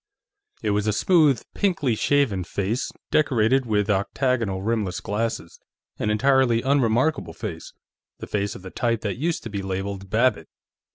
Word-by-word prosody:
It 105 - +1
was 105 +1 0
a 105 - +2
smooth, 150 - +3
pinkly 170 - +1
shaven 110 -5 +1
face, 100 +7 -2 0.2
decorated 130 -3 +2
with 105 -2 +1
octagonal 105 0 0
rimless 105 -4 -1
glasses; 105 -5 -3 0.4
an 105 - 0
entirely 120 +1 +3
unremarkable 135 +2 +1
face; - - -7 0.5
the - - -7
face 100 -1 -2
of - - -11
the 95 - -8
type 115 -2 0
that 105 0 -3
used 165 +5 -1
to 115 - -7
be 100 -1 -3
labeled 95 0 -4
"Babbitt." 120 +5 +2
110 Hz, 150 wpm, -24 LUFS, 100-130 Hz, 0.5 s, smooth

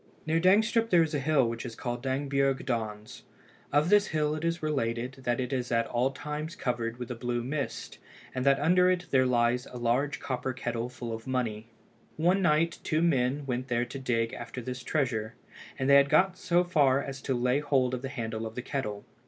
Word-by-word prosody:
Near 160 +1 +2
Dangstrup 220 +5 +3
there 175 -5 +5
is 160 0 -3
a 145 - +1
hill 140 -3 +2
which 115 0 -4
is 120 -3 -7
called 120 -1 -4
Dangbjerg 135 0 0
Dons. 110 -4 -4 0.5
Of 150 +4 +3
this 205 0 +5
hill 150 -1 0
it 155 +1 -4
is 170 -1 -1
related 125 -3 -1
that 120 0 +1
it 125 +1 -2
is 125 -1 -2
at 115 0 +2
all 125 +2 +1
times 150 +4 -5
covered 120 -2 -2
with 125 -1 -6
a - - -3
blue 120 0 -2
mist, 140 +3 -4 0.3
and 130 - -2
that 140 0 +4
under 180 +4 +4
it 180 -1 0
there 130 -1 +4
lies 120 0 +1
a 125 - -9
large 125 +5 0
copper 130 0 -3
kettle 120 -1 -3
full 120 -2 -6
of 115 +2 -7
money. 115 -4 -2 0.5
One 180 +5 +3
night 165 -1 +2
two 160 +1 +1
men 140 -3 +1
went 125 -1 -3
there 120 -1 0
to 130 +3 -7
dig 115 -3 0
after - - -7
this 125 +1 -5
treasure, 120 -6 -1 0.4
and 130 - -1
they 140 0 +8
had 140 0 +4
got 190 +3 +4
so 175 -1 +2
far 140 -6 +3
as 135 -1 -7
to 135 - -1
lay 125 +3 +2
hold 135 -4 +1
of 125 - -2
the 135 - -4
handle 115 -4 -4
of 110 - -10
the 125 - -4
kettle. 105 -7 -4
130 Hz, 210 wpm, -29 LUFS, 120-150 Hz, 0.5 s, they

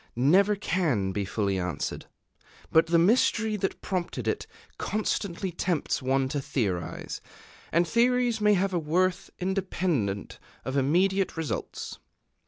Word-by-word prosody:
never 185 - +4
can 160 - 0
be 100 +1 -1
fully 100 -1 -1
answered. 90 -5 -3 0.6
But 160 +1 +5
the 170 +1 +4
mystery 215 +3 +3
that 195 -1 -3
prompted 180 -3 -3
it - - -1 0.3
constantly 200 -3 -1
tempts 175 -3 -1
one 135 +1 +1
to 145 0 -2
theorize; 100 -10 -3 0.5
and 170 +1 +3
theories 240 +1 +2
may 210 0 +5
have 190 +1 0
a 175 - +2
worth 180 +4 0
independent 180 - -1 0.3
of 130 +2 -3
immediate 180 +8 +2
results. 160 -2 -4
170 Hz, 125 wpm, -27 LUFS, 130-195 Hz, 0.6 s, But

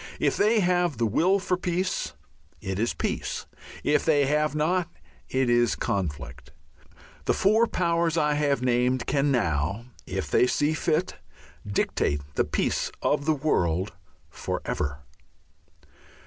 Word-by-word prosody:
If - - +2
they 215 +1 +3
have 175 - +1
the 115 - +1
will 175 - +3
for 185 -1 -1
peace, 180 - -2 0.5
it 95 0 -4
is 115 +2 +1
peace. - - -3 0.4
If 150 - +2
they 145 -3 +3
have 150 +2 +1
not, 170 +3 +1 0.4
it 130 -1 +1
is 120 0 +3
conflict. 80 -12 -4 0.8
The - - +2
four 220 +4 +3
powers 170 -3 0
I 150 -2 +2
have 145 -3 +1
named 125 0 +1
can 140 +1 +1
now, 90 - 0 0.2
if - - -3
they 125 - +4
see 145 +4 +1
fit, 160 +2 -1 0.5
dictate 75 -7 0
the - - +1
peace - - -1
of 140 - +1
the 155 -1 +2
world 95 - 0 0.4
for - - -3
ever. 75 0 -3
145 Hz, 135 wpm, -26 LUFS, 110-170 Hz, 0.8 s, they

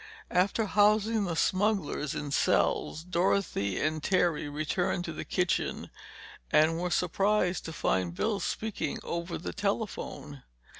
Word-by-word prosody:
After 195 +5 +2
housing 210 +1 +3
the 170 -3 -2
smugglers 185 -5 0
in 145 -1 -4
cells, 155 +2 +1
Dorothy 175 - 0
and 155 0 0
Terry 170 -4 +1
returned 155 +4 -1
to 165 - -4
the - - -5
kitchen 180 -1 -1 0.6
and 160 +2 +4
were 180 +1 -1
surprised 185 +1 +1
to 165 - -5
find 95 - 0
Bill 215 - 0
speaking 215 -10 -3
over 170 +1 -3
the 170 - -6
telephone. 200 - -3
175 Hz, 130 wpm, -29 LUFS, 155-200 Hz, 0.6 s, and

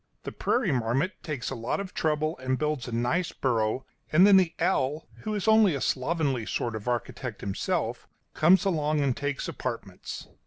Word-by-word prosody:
The - - -5
prairie 240 -9 0
marmot 130 - 0
takes 145 -7 -4
a - - -3
lot 115 +7 -2
of 200 -2 -6
trouble 155 0 0
and 130 0 -1
builds 150 -4 -1
a - - -5
nice 125 +10 0
burrow, 120 0 0 0.3
and 170 +5 +7
then 200 -1 +7
the 180 -3 +2
owl, 155 -4 0
who 215 -1 -3
is 205 -1 -2
only 220 -6 +5
a - - -2
slovenly 135 -4 0
sort 115 -2 -2
of 110 +2 -7
architect 120 -1 -3
himself, 100 -1 -2 0.3
comes 185 +6 +5
along 155 -5 +1
and 135 -3 +1
takes 145 -1 -3
apartments. 115 -7 -6
145 Hz, 180 wpm, -27 LUFS, 125-170 Hz, 0.3 s, and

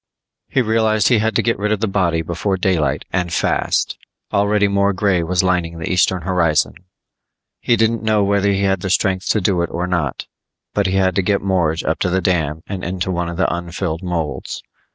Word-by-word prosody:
He 130 - +2
realized 110 -2 +2
he 120 -4 +4
had 110 +1 0
to - - +2
get 115 -2 0
rid 105 +1 0
of 110 - +1
the 110 - 0
body 85 -5 0
before 85 +4 -2
daylight 90 -5 0
and 90 -2 -1
fast! - - 0 0.3
Already 100 0 +3
more 100 0 +2
grey 95 -2 +1
was 90 +2 0
lining 90 -2 0
the 80 - -4
eastern 90 -1 +2
horizon. 85 -4 +1 0.9
He 120 - +2
didn't 115 0 +1
know 110 -2 +2
whether 100 0 +2
he 100 0 0
had 95 -1 +1
the 95 - -3
strength 95 0 +1
to 110 - +2
do 90 -2 +1
it 85 - -1
or 90 +1 -2
not, 90 -2 -2 0.5
but 100 -2 +1
he 95 - -1
had 95 -1 +2
to - - +4
get 100 +1 0
Morge 85 -4 0
up 80 - -1
to 90 - 0
the 95 +1 +1
dam 80 -4 -1
and 95 -2 -6
into 90 +1 -2
one 85 -1 -2
of 85 - -6
the 95 - +1
unfilled 85 -1 -4
molds. 80 -7 -4
95 Hz, 210 wpm, -19 LUFS, 85-100 Hz, 0.9 s, he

